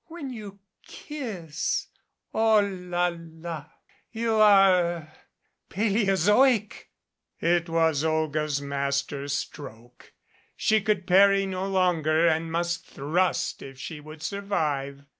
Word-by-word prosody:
When 320 Hz, -5 st, -7 dB
you 210 Hz, -4 st, -9 dB, 0.2 s
kiss 205 Hz, -, -4 dB, 0.5 s
Oh, 220 Hz, -1 st, +4 dB
la 180 Hz, -3 st, -2 dB
la! 165 Hz, -2 st, -8 dB, 0.5 s
You 225 Hz, 0 st, -1 dB
are 195 Hz, -4 st, +6 dB
er 170 Hz, -2 st, -4 dB, 0.6 s
paleozoic 210 Hz, +3 st, +2 dB, 0.3 s
!" -, -, -60 dB, 0.2 s
It 170 Hz, 0 st, +1 dB
was 160 Hz, -3 st, +2 dB
Olga's 155 Hz, -2 st, 0 dB
master 140 Hz, 0 st, -2 dB
stroke. 125 Hz, -4 st, -7 dB, 0.4 s
She 220 Hz, 0 st, +2 dB
could 200 Hz, -3 st, 0 dB
parry 195 Hz, +1 st, +5 dB
no 190 Hz, 0 st, -3 dB
longer 170 Hz, -4 st, +2 dB
and 160 Hz, 0 st, 0 dB
must 170 Hz, +1 st, -1 dB
thrust 170 Hz, +7 st, -1 dB
if 135 Hz, -1 st, -10 dB
she 150 Hz, +4 st, -7 dB
would 155 Hz, +1 st, -11 dB
survive. 150 Hz, -8 st, -2 dB
175 Hz, 110 wpm, -26 LUFS, 155-200 Hz, 0.6 s, are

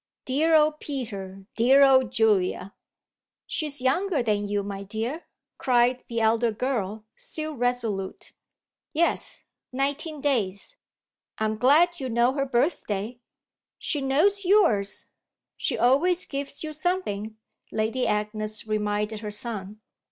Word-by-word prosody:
Dear 310 Hz, +5 st, +2 dB
old 305 Hz, 0 st, +4 dB
Peter, 200 Hz, -9 st, -6 dB
dear 265 Hz, +5 st, +6 dB
old 260 Hz, -2 st, +5 dB
Julia!" 200 Hz, -3 st, +1 dB, 0.7 s
"She's 295 Hz, -3 st, -1 dB
younger 315 Hz, +2 st, +1 dB
than 205 Hz, -2 st, 0 dB
you, 205 Hz, 0 st, -1 dB
my 200 Hz, 0 st, -5 dB
dear!" 225 Hz, -, -4 dB, 0.3 s
cried 245 Hz, 0 st, +2 dB
the 230 Hz, -1 st, -2 dB
elder 225 Hz, +1 st, +3 dB
girl, 215 Hz, -3 st, -3 dB
still 310 Hz, 0 st, -5 dB
resolute. 235 Hz, -7 st, -2 dB, 0.6 s
"Yes, 335 Hz, +2 st, 0 dB, 0.3 s
nineteen 285 Hz, +4 st, -2 dB
days." 235 Hz, -, -1 dB, 0.6 s
"I'm 220 Hz, 0 st, 0 dB
glad 315 Hz, +9 st, +4 dB
you 260 Hz, -2 st, -3 dB
know 235 Hz, +2 st, +2 dB
her 275 Hz, -1 st, 0 dB
birthday." 235 Hz, -, -1 dB, 0.6 s
"She 295 Hz, -, -2 dB
knows 335 Hz, +10 st, +3 dB
yours; 350 Hz, -, +2 dB, 0.4 s
she -, -, -2 dB
always 340 Hz, +9 st, +3 dB
gives 280 Hz, +1 st, -5 dB
you 310 Hz, -1 st, -5 dB
something," 300 Hz, -, -2 dB, 0.3 s
Lady 225 Hz, +4 st, 0 dB
Agnes 215 Hz, +1 st, -2 dB
reminded 210 Hz, 0 st, -1 dB
her 210 Hz, -1 st, -5 dB
son. 210 Hz, -1 st, -5 dB
245 Hz, 120 wpm, -26 LUFS, 210-285 Hz, 0.7 s, dear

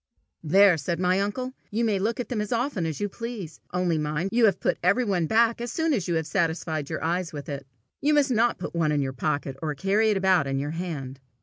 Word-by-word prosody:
"There," 185 Hz, +3 st, +5 dB
said 170 Hz, +4 st, -2 dB
my 180 Hz, +1 st, +2 dB
uncle, 250 Hz, +6 st, -2 dB, 0.2 s
"you 230 Hz, +3 st, 0 dB
may 210 Hz, -3 st, +1 dB
look 225 Hz, +5 st, -1 dB
at 245 Hz, -, -3 dB
them 235 Hz, -5 st, -1 dB
as 210 Hz, -, -4 dB
often 235 Hz, -, 0 dB
as 155 Hz, -, -4 dB
you 205 Hz, -, 0 dB
please; 205 Hz, -7 st, -7 dB
only 180 Hz, -3 st, +1 dB
mind 150 Hz, +5 st, -2 dB
you 230 Hz, -3 st, +5 dB
put -, -, -2 dB
every 200 Hz, +8 st, +3 dB
one 180 Hz, -6 st, 0 dB
back 230 Hz, +3 st, +3 dB
as 240 Hz, 0 st, -3 dB
soon 320 Hz, +4 st, +1 dB
as 200 Hz, -9 st, -1 dB
you 170 Hz, -, 0 dB
have 160 Hz, -1 st, 0 dB
satisfied 160 Hz, -3 st, -1 dB
your -, -, -4 dB
eyes 170 Hz, +1 st, -1 dB
with 145 Hz, -1 st, -7 dB
it. 140 Hz, -1 st, -6 dB, 0.3 s
You 300 Hz, +1 st, +3 dB
must 285 Hz, -2 st, +3 dB
not 235 Hz, 0 st, +2 dB
put -, -, -6 dB
one 165 Hz, -3 st, +1 dB
in 145 Hz, -2 st, +1 dB
your 135 Hz, -1 st, -3 dB
pocket, 140 Hz, 0 st, -2 dB
or 155 Hz, -2 st, -2 dB
carry 200 Hz, +7 st, +2 dB
it 210 Hz, -, +2 dB
about 185 Hz, -6 st, +3 dB
in 135 Hz, 0 st, -1 dB
your 145 Hz, +2 st, -2 dB
hand." 150 Hz, -6 st, -5 dB
185 Hz, 240 wpm, -26 LUFS, 155-225 Hz, 0.3 s, There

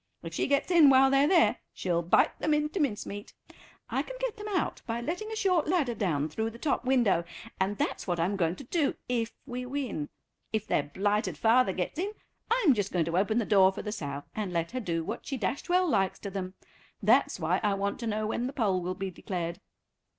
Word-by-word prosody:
If 165 Hz, -1 st, -7 dB
she -, -, 0 dB
gets 280 Hz, +5 st, +1 dB
in 330 Hz, -5 st, +8 dB
while 265 Hz, 0 st, +6 dB
they're 275 Hz, +1 st, +4 dB
there 340 Hz, -1 st, +4 dB, 0.2 s
she'll 175 Hz, -2 st, 0 dB
bite 170 Hz, -, +3 dB
them 305 Hz, -1 st, +2 dB
into 300 Hz, +5 st, -1 dB
mincemeat. 205 Hz, -7 st, -3 dB, 0.5 s
I -, -, 0 dB
can -, -, -8 dB
get -, -, -2 dB
them 420 Hz, -1 st, -7 dB
out 380 Hz, -5 st, -1 dB
by 230 Hz, 0 st, -2 dB
letting 360 Hz, -, -4 dB
a -, -, -3 dB
short 365 Hz, -7 st, +2 dB
ladder 305 Hz, -8 st, +1 dB
down 165 Hz, -9 st, 0 dB
through 220 Hz, +9 st, -2 dB
the 230 Hz, -, -11 dB
top 275 Hz, -1 st, 0 dB
window, 235 Hz, -10 st, +3 dB, 0.4 s
and 195 Hz, +2 st, 0 dB
that's -, -, -2 dB
what 175 Hz, -2 st, -1 dB
I'm 180 Hz, +5 st, +1 dB
going 170 Hz, -2 st, 0 dB
to 275 Hz, -, -10 dB
do 290 Hz, +2 st, 0 dB
if 235 Hz, -2 st, -1 dB
we 250 Hz, -1 st, -5 dB
win. 250 Hz, -, -3 dB, 0.4 s
If 215 Hz, -1 st, -1 dB
their -, -, +2 dB
blighted 205 Hz, +9 st, -1 dB
father 230 Hz, -1 st, +4 dB
gets 185 Hz, -, -3 dB
in, 400 Hz, +4 st, -2 dB, 0.4 s
I'm 450 Hz, -, +4 dB
just 205 Hz, -4 st, -2 dB
going 170 Hz, -3 st, +1 dB
to 165 Hz, +2 st, -1 dB
open 215 Hz, +3 st, +1 dB
the 235 Hz, -, +1 dB
door 195 Hz, -3 st, +5 dB
for -, -, -7 dB
the 210 Hz, -, -4 dB
sow, 145 Hz, -8 st, -5 dB
and 210 Hz, -4 st, -3 dB
let 170 Hz, -1 st, -1 dB
her 255 Hz, -, -3 dB
do 170 Hz, -7 st, -2 dB
what 215 Hz, +8 st, -6 dB
she 270 Hz, -, -2 dB
dashed 250 Hz, -, -3 dB
well 365 Hz, +1 st, +3 dB
likes 195 Hz, -, +1 dB
to 200 Hz, -, -5 dB
them. 185 Hz, -1 st, -5 dB, 0.5 s
That's 235 Hz, +1 st, +3 dB
why 170 Hz, +3 st, +1 dB
I 205 Hz, -3 st, +1 dB
want 200 Hz, 0 st, -2 dB
to 235 Hz, -, -4 dB
know 215 Hz, 0 st, -1 dB
when 235 Hz, +3 st, -1 dB
the 270 Hz, -, -6 dB
poll 200 Hz, -9 st, +1 dB
will 180 Hz, +1 st, -3 dB
be 190 Hz, +1 st, -4 dB
declared." 175 Hz, -1 st, -4 dB
220 Hz, 225 wpm, -29 LUFS, 185-280 Hz, 0.5 s, in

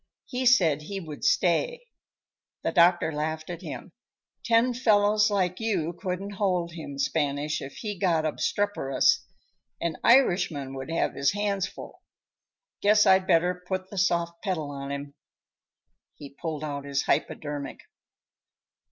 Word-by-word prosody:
He 255 Hz, 0 st, -1 dB
said 165 Hz, -, +4 dB
he 195 Hz, +6 st, -5 dB
would 155 Hz, -5 st, -9 dB
stay. 485 Hz, -, +1 dB, 0.8 s
The -, -, 0 dB
doctor 175 Hz, -2 st, +4 dB
laughed 155 Hz, +2 st, -3 dB
at 170 Hz, 0 st, -7 dB
him. -, -, -8 dB, 0.5 s
"Ten 235 Hz, +1 st, +3 dB
fellows 210 Hz, -3 st, +3 dB
like 185 Hz, -3 st, 0 dB
you 185 Hz, -8 st, -1 dB
couldn't 185 Hz, +2 st, -4 dB
hold 180 Hz, -4 st, 0 dB
him, 155 Hz, -4 st, -8 dB
Spanish, 145 Hz, +1 st, -1 dB
if 135 Hz, -, -7 dB
he 205 Hz, -4 st, -5 dB
got 165 Hz, -4 st, +2 dB
obstreperous; 155 Hz, -3 st, +1 dB, 0.6 s
an 170 Hz, -2 st, -2 dB
Irishman 175 Hz, -, +3 dB
would 135 Hz, +2 st, -6 dB
have 165 Hz, -, 0 dB
his 140 Hz, +3 st, +1 dB
hands 200 Hz, -2 st, -1 dB
full. -, -, -11 dB, 0.8 s
Guess 210 Hz, +1 st, +5 dB
I'd 190 Hz, 0 st, +4 dB
better 180 Hz, +2 st, +2 dB
put 185 Hz, 0 st, -3 dB
the 200 Hz, -, -8 dB
soft 170 Hz, -2 st, 0 dB
pedal 165 Hz, -8 st, -2 dB
on 140 Hz, 0 st, -6 dB
him." 140 Hz, 0 st, -6 dB, 1.0 s
He 140 Hz, -2 st, -11 dB
pulled 155 Hz, 0 st, -5 dB
out 145 Hz, -2 st, -4 dB
his 140 Hz, 0 st, -1 dB
hypodermic. 145 Hz, -2 st, -2 dB
175 Hz, 135 wpm, -27 LUFS, 150-200 Hz, 1.0 s, Guess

